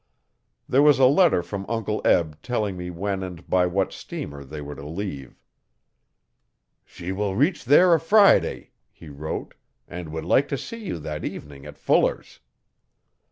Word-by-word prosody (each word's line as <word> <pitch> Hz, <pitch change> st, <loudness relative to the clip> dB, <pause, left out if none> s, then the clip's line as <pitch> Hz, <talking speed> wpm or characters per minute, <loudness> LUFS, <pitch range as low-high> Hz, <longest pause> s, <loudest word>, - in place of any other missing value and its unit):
There 135 Hz, -, +3 dB
was 150 Hz, -1 st, +6 dB
a 130 Hz, -, +5 dB
letter 145 Hz, -, +4 dB
from 100 Hz, +1 st, -5 dB
Uncle 110 Hz, -2 st, -2 dB
Eb 80 Hz, -3 st, +2 dB
telling 110 Hz, -6 st, -2 dB
me 90 Hz, 0 st, -6 dB
when 95 Hz, +3 st, -3 dB
and 90 Hz, -2 st, -8 dB
by 90 Hz, -1 st, +2 dB
what 95 Hz, +2 st, -1 dB
steamer 70 Hz, -1 st, -7 dB
they 75 Hz, +3 st, -9 dB
were 75 Hz, 0 st, -7 dB
to 70 Hz, -, -10 dB
leave. 75 Hz, -4 st, -6 dB, 1.4 s
'She 90 Hz, +1 st, -8 dB
will 100 Hz, 0 st, -2 dB
reach 145 Hz, -, +1 dB
there 170 Hz, +7 st, +6 dB
a 165 Hz, -, +4 dB
Friday,' 200 Hz, +5 st, +3 dB, 0.2 s
he 80 Hz, -, -14 dB
wrote, 75 Hz, +2 st, -6 dB, 0.3 s
'and 90 Hz, -2 st, -7 dB
would 80 Hz, 0 st, -5 dB
like 135 Hz, +10 st, +3 dB
to 140 Hz, -, -2 dB
see 230 Hz, -, -8 dB
you 185 Hz, -, -4 dB
that 75 Hz, -1 st, -6 dB
evening 70 Hz, -2 st, -8 dB
at -, -, -11 dB
Fuller's'. -, -, 0 dB
95 Hz, 160 wpm, -24 LUFS, 80-130 Hz, 1.4 s, was